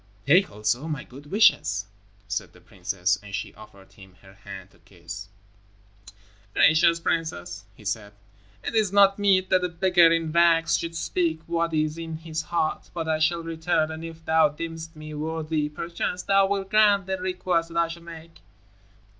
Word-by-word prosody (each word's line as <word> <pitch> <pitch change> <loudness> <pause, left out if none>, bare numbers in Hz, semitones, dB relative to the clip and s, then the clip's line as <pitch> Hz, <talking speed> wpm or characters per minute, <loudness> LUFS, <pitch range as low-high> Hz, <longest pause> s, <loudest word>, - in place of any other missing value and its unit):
"Take 180 +7 +5
also 105 +8 -1
my 150 -4 -4
good 140 +3 -14
wishes," 105 - +3 0.4
said - - -4
the - - -18
princess, 90 0 -2
and 100 -1 -7
she - - -5
offered 100 -2 -16
him 95 -2 -16
her 95 0 -16
hand 95 -1 -11
to - - -25
kiss. 90 +1 -10 1.3
"Gracious 165 +2 +5
princess," 160 - -3
he 105 - -17
said, 105 0 -3 0.5
"it - - -4
is 215 -4 +2
not 200 0 +5
meet 190 -2 +3
that 185 -1 +4
a 180 - 0
beggar 175 -1 +4
in 165 -1 0
rags 165 0 +4
should 165 0 -3
speak 165 -1 -1
what 170 0 -1
is 155 +1 0
in 165 -1 -5
his 160 0 -4
heart. 160 0 -2
But 165 -2 -3
I 160 -1 +1
shall 165 +1 +1
return, 160 -1 0
and 160 +1 -7
if 165 -1 -9
thou 160 -1 +4
deemest 165 +2 -7
me 155 0 -9
worthy, 155 0 -2
perchance 170 +3 -4
thou 195 -1 +4
wilt 195 -1 -2
grant 205 -3 +4
a 190 0 -1
request 180 -2 -1
that 170 - -6
I 170 0 +3
shall 170 +1 -8
make." 165 -1 -12
165 Hz, 175 wpm, -25 LUFS, 150-170 Hz, 1.3 s, Take